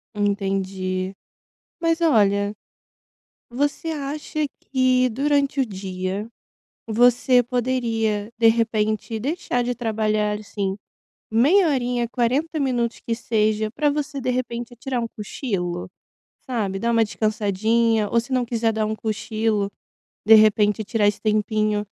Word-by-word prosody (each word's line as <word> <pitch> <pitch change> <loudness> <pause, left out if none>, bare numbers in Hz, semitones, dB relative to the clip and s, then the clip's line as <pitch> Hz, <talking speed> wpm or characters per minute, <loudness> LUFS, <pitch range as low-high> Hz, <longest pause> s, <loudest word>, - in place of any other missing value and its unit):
Entendi. 195 -2 -1 0.7
Mas 330 0 +1
olha, 205 -9 +3 1.0
você 285 +6 -1
acha 300 0 -3 0.3
que 255 -1 +3
durante 280 +3 +1
o 265 - +3
dia 190 0 -4 0.6
você 245 +2 +4
poderia, 230 -4 -1
de 230 -1 +5
repente, 220 -1 0
deixar 260 -1 -1
de 245 +1 -1
trabalhar, 215 -2 0
assim, 200 -2 -3 0.6
meia 310 - +4
horinha, 245 -4 0
40 270 +7 0
minutos 245 -4 -1
que 230 - -2
seja, 215 -2 0
para 295 +5 +1
você 290 0 -3
de 255 - -1
repente 240 -1 -3
tirar 255 0 -3
um 230 - -2
cochilo, 185 -6 -4 0.5
sabe? 210 -7 -2
Dar 235 +4 0
uma 230 -1 +4
descansadinha 215 +1 +1
ou 235 - +3
se 245 - -13
não 255 -1 +2
quiser 230 -1 0
dar 220 0 0
um 215 - -1
cochilo, 215 -1 -1 0.6
de 220 - +8
repente, 215 0 +4
tirar 210 -1 +1
esse 205 - 0
tempinho 215 -1 +1
225 Hz, 125 wpm, -23 LUFS, 210-250 Hz, 1.0 s, de